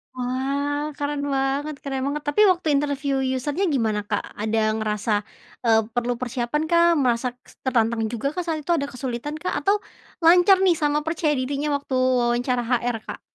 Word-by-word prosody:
Wah, 280 +4 -2
keren 290 0 -2
banget 275 +3 -1
keren 270 -2 -3
banget. 295 +1 -3
Tapi 420 +9 +2
waktu 355 -3 -2
interview 280 -1 0
user-nya 290 +8 -2
gimana, 215 -4 0
Kak? 205 0 -1 0.2
Ada 215 0 +1
ngerasa, 215 0 -1 0.5
eee, 225 -1 +5
perlu 245 0 0
persiapan 250 +4 -2
kah? 340 0 +4
Merasa 245 -1 +1 0.2
s - - -18
tertantang 230 -3 +1
juga 240 +3 -2
kah 360 - -1
saat 325 -2 -2
itu? 305 - -3
Ada 280 -3 -1
kesulitan 255 +3 -4
kah? 365 - -2
Atau 405 +1 +2 0.4
lancar 355 +3 +6
nih 370 -3 +4
sama 295 -1 +1
percaya 320 0 -1
dirinya 280 +3 -2
waktu 275 -1 -4
wawancara 250 -1 +2
HR, 245 -1 0
Kak? - - -6
270 Hz, 165 wpm, -23 LUFS, 240-300 Hz, 0.5 s, lancar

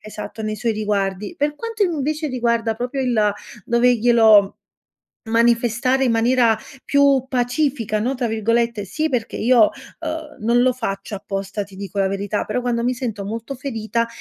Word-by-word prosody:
esatto, 215 +1 -8
nei 215 0 -3
suoi 230 +2 0
riguardi. 210 - -2
Per 295 +1 0
quanto, 455 +2 -3
invece, 310 -2 -1
riguarda 235 -3 0
proprio 245 +4 -3
il 220 -5 +2 0.3
doverglielo 235 -3 +5
m 195 - -9 0.8
manifestare 235 +3 +2
in 240 - +2
maniera 230 0 +3 0.3
più 280 -2 +3
"pacifica", 245 -3 0
no, 255 +5 0
tra 245 -2 -2
virgolette 230 0 0
sì 310 - -2
perché 240 -5 -2
io, 235 -2 +4 0.3
uhm, 315 -1 -5
non 235 +3 +3
lo 255 0 +3
faccio 205 -4 -4
apposta, 195 +1 -4
ti 195 0 -16
dico 200 0 -6
la 195 - +3
verità, 200 +1 -2
però, 215 +4 -2
quando 240 -1 -1
mi 250 +1 +1
sento 225 -6 -4
molto 230 +6 -5
ferita, 230 -3 -2
235 Hz, 160 wpm, -21 LUFS, 215-255 Hz, 0.8 s, doverglielo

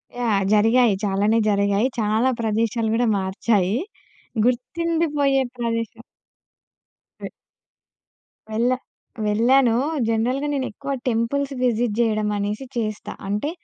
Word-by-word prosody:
Yeah! 220 -5 +1
జరిగాయి. 225 +1 +4
చాలానే 205 +3 +2
జరిగాయి. 200 +2 +2
చాలా 220 +4 +2
ప్రదేశాలు 225 +1 0
గూడా 240 +1 +2
మార్చాయి. 195 +1 0 0.7
గుర్తుండిపోయే 290 +2 +1 0.2
ప్రదేశం 230 -1 -3 1.2
వె - - -6 1.2
వెళ్ళా 235 +4 +1 0.5
వెళ్ళాను. 235 +3 +3 0.3
జనరల్‌గా 250 +6 0
నేనెక్కువ 275 +1 -4 0.2
టెంపుల్స్ 270 +5 -1
విజిట్ 235 -3 +1
చేయడం 215 -2 +1
అనేసి 205 +5 -3
చేస్తా. 215 -2 -3 0.2
అంటే 210 +9 -1
230 Hz, 90 wpm, -22 LUFS, 210-255 Hz, 1.2 s, జరిగాయి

